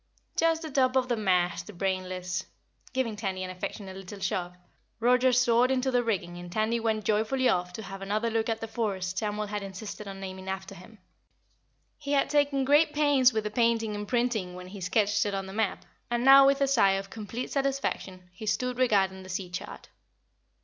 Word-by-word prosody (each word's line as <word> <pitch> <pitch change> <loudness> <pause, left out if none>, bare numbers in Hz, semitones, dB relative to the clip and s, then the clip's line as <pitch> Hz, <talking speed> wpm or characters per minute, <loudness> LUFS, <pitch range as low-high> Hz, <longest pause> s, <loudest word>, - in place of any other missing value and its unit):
"Just 330 0 +2
the 315 - -6
top 260 -1 +2
of 255 -1 +2
the 240 - +2
main 215 -2 -5
mast, 180 0 0
Brainless." 185 -1 -2 0.4
Giving 255 -4 -1
Tandy 190 -3 -3
an 185 - -5
affectionate 190 +1 -6
little 195 +1 -9
shove, 180 -2 -2 0.4
Roger 250 +2 +4
soared 245 0 +4
into 265 0 +1
the 245 -1 +3
rigging 175 -6 -2
and 175 0 -9
Tandy 220 +4 0
went 220 -2 -1
joyfully 220 +5 +1
off 180 -3 +1
to 220 - -6
have 195 0 -8
another 215 +4 -1
look 225 0 0
at 225 0 -2
the 225 - -4
forest 195 -5 -2
Samuel 210 0 -2
had 205 0 -4
insisted 200 +2 -7
on 195 0 -7
naming 190 0 -7
after 190 0 -5
him. 200 +5 -14 1.0
He 290 -1 -3
had 275 - +2
taken 285 -2 +2
great 295 +2 +4
pains 285 -4 +5
with 220 -2 -1
the 210 - -3
painting 230 -1 +1
and 205 0 -5
printing 230 -6 0
when 180 0 -9
he 195 0 -9
sketched 205 +2 +2
it 200 - -2
on 195 0 -3
the 190 - -8
map, 215 -1 -1 0.2
and 240 +1 0
now 270 0 +9
with 275 0 +3
a 275 - +4
sigh 225 -8 +4
of 195 0 -4
complete 225 +3 -5
satisfaction 270 -10 -2
he 215 +4 -8
stood 250 +3 -1
regarding 195 -6 +2
the 185 - -11
sea 180 -1 -4
chart. 180 - -7
215 Hz, 200 wpm, -28 LUFS, 190-250 Hz, 1.0 s, now